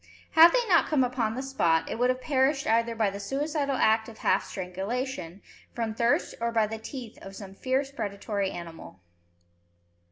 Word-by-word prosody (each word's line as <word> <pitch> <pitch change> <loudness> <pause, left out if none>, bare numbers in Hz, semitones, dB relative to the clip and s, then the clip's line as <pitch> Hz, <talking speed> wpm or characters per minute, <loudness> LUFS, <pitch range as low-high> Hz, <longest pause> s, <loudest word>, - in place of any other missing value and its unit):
Had 330 +2 +8
they - - +1
not 345 -4 +4
come 295 -4 +2
upon 240 -3 -1
the 260 - -3
spot, 165 -12 +1
it - - -4
would 250 +1 +3
have 255 0 0
perished 275 0 +1
either 230 +1 +1
by 220 -3 +1
the 200 - -7
suicidal 280 +5 -1
act 220 -1 +2
of 220 - -12
half 190 - +2
strangulation, 195 +1 -5 0.3
from 230 -2 -2
thirst, 235 +2 +1
or 235 0 0
by 225 -2 +3
the 220 +1 -6
teeth 235 0 -8
of 195 0 -10
some 195 -1 -9
fierce 265 +6 -1
predatory 200 -5 -3
animal. 165 - -9
230 Hz, 180 wpm, -27 LUFS, 200-270 Hz, 0.3 s, Had